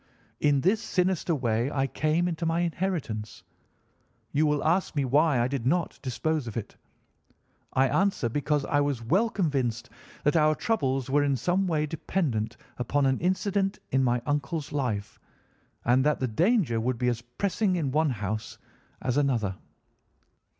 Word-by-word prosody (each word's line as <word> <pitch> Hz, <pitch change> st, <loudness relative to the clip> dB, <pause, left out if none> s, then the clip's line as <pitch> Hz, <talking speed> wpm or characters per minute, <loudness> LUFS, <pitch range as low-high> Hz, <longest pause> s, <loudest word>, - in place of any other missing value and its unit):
"In 145 Hz, -2 st, +3 dB
this 205 Hz, +7 st, +2 dB
sinister 180 Hz, -5 st, 0 dB
way 120 Hz, -2 st, 0 dB
I 135 Hz, -2 st, 0 dB
came 155 Hz, +5 st, 0 dB
into 170 Hz, -1 st, -3 dB
my 165 Hz, +1 st, +1 dB
inheritance. 165 Hz, -, -3 dB, 0.9 s
You 155 Hz, +2 st, +2 dB
will 150 Hz, -1 st, +1 dB
ask 175 Hz, +2 st, +1 dB
me 140 Hz, -2 st, +1 dB
why 145 Hz, +1 st, +3 dB
I 120 Hz, -, +2 dB
did 130 Hz, -2 st, -2 dB
not 170 Hz, +5 st, 0 dB
dispose 145 Hz, +2 st, -1 dB
of 115 Hz, -, -5 dB
it? 115 Hz, -, -5 dB, 1.0 s
I 135 Hz, +1 st, +4 dB
answer, 190 Hz, -6 st, +1 dB
because 145 Hz, +3 st, 0 dB
I 145 Hz, -2 st, +2 dB
was 140 Hz, -5 st, -1 dB
well 195 Hz, -, +2 dB
convinced 130 Hz, -, -1 dB, 0.3 s
that 150 Hz, -, +2 dB
our 155 Hz, -1 st, +4 dB
troubles 135 Hz, -, -1 dB
were 145 Hz, +1 st, +4 dB
in 140 Hz, -1 st, +2 dB
some 175 Hz, -, +1 dB
way 155 Hz, -3 st, +1 dB
dependent 135 Hz, -, -2 dB, 0.2 s
upon 135 Hz, +4 st, +1 dB
an 130 Hz, -1 st, +2 dB
incident 195 Hz, +2 st, 0 dB
in 135 Hz, 0 st, +3 dB
my 120 Hz, -1 st, +1 dB
uncle's 145 Hz, +1 st, -2 dB
life, 120 Hz, -8 st, -2 dB, 0.7 s
and 125 Hz, +2 st, +4 dB
that 150 Hz, +1 st, +2 dB
the 130 Hz, -, 0 dB
danger 155 Hz, -, +2 dB
would 125 Hz, +1 st, -1 dB
be 125 Hz, -, 0 dB
as 120 Hz, -1 st, 0 dB
pressing 185 Hz, -, -1 dB
in 150 Hz, -6 st, -1 dB
one 155 Hz, +2 st, +2 dB
house 110 Hz, -2 st, -4 dB, 0.5 s
as 130 Hz, +1 st, 0 dB
in 145 Hz, -, +3 dB
another. 105 Hz, -7 st, -1 dB
145 Hz, 165 wpm, -27 LUFS, 125-170 Hz, 1.0 s, I